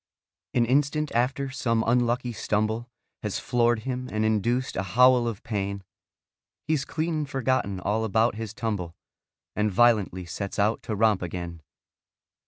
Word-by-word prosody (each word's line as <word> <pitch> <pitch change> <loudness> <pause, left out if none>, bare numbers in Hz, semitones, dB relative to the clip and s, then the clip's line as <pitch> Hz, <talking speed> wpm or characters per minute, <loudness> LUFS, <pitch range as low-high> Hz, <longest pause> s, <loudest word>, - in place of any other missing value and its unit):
An 120 -2 +4
instant 145 +4 +1
after 130 +3 0
some 115 -5 0
unlucky 120 +1 +1
stumble 110 +2 -1 0.3
Has 105 -2 -2
floored 120 -2 +1
him 125 +1 -4
and 110 0 0
induced 115 +4 0
a - - 0 0.2
howl 125 -1 +6
of 110 -4 -4
pain, 100 -3 -3 0.8
He's 150 -3 0
clean 155 -1 -1
forgotten 130 -8 0
all 105 +4 0
about 110 +2 +2
his 110 -1 -5
tumble 100 -7 -3 0.6
And 105 0 +1
violently 105 -4 +3
sets 95 +3 -5
out 105 +2 +2
to 110 - -4
romp 110 -2 +3
again. 85 -1 -5
115 Hz, 140 wpm, -26 LUFS, 105-125 Hz, 0.8 s, howl